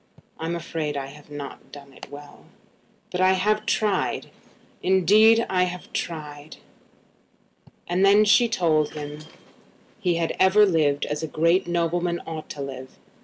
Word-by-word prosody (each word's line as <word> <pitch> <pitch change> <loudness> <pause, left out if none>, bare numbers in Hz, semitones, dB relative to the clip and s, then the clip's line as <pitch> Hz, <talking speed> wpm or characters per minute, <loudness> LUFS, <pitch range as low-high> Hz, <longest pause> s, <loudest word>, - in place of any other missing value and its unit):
"I'm 165 +1 -3
afraid 160 -3 -4
I 135 - -3
have 145 +2 -14
not 145 -1 -9
done 140 -1 -13
it - - -12
well; 145 0 -13 0.7
but 180 - -2
I 185 0 +5
have 210 +3 0
tried; 210 -2 -1 0.5
indeed 210 +5 +4
I 180 -1 +1
have 180 0 -8
tried." 150 -2 -6 1.3
Then 195 +4 +4
she 235 +3 +4
told 155 -8 +1
him 150 0 -7 0.8
he 180 -5 0
had 165 -1 -2
ever 190 +3 +5
lived 155 -6 +1
as 150 0 -4
a 160 - -3
great 170 +4 +1
nobleman 175 0 -1
ought 160 -1 -7
to 145 - -6
live. 130 -1 -9
170 Hz, 140 wpm, -24 LUFS, 150-190 Hz, 1.3 s, I